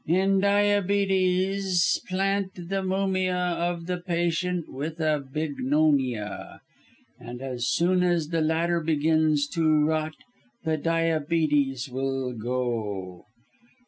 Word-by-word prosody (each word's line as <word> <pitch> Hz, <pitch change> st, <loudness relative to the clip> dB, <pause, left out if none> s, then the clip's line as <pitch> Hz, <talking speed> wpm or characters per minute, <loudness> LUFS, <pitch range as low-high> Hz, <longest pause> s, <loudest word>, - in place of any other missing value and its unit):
"In 190 Hz, +4 st, +3 dB
diabetes, 195 Hz, -2 st, +2 dB
plant 195 Hz, +1 st, 0 dB
the 185 Hz, +2 st, -3 dB
mumia 185 Hz, -1 st, 0 dB, 0.2 s
of 170 Hz, -1 st, -2 dB
the 180 Hz, 0 st, -2 dB
patient 175 Hz, 0 st, -1 dB
with 155 Hz, +5 st, -6 dB
a 155 Hz, -2 st, +1 dB
bignonia, 140 Hz, -6 st, -1 dB, 0.6 s
and 120 Hz, 0 st, -8 dB
as 125 Hz, -2 st, -3 dB
soon 180 Hz, +2 st, +2 dB
as 175 Hz, -4 st, +1 dB
the 165 Hz, -1 st, 0 dB
latter 165 Hz, +2 st, +1 dB
begins 155 Hz, -1 st, +2 dB
to 155 Hz, -3 st, +2 dB
rot, 155 Hz, 0 st, -1 dB, 0.5 s
the 160 Hz, -1 st, 0 dB
diabetes 155 Hz, -4 st, +1 dB
will 135 Hz, 0 st, -2 dB
go. 110 Hz, -6 st, -3 dB
160 Hz, 105 wpm, -26 LUFS, 145-185 Hz, 0.6 s, In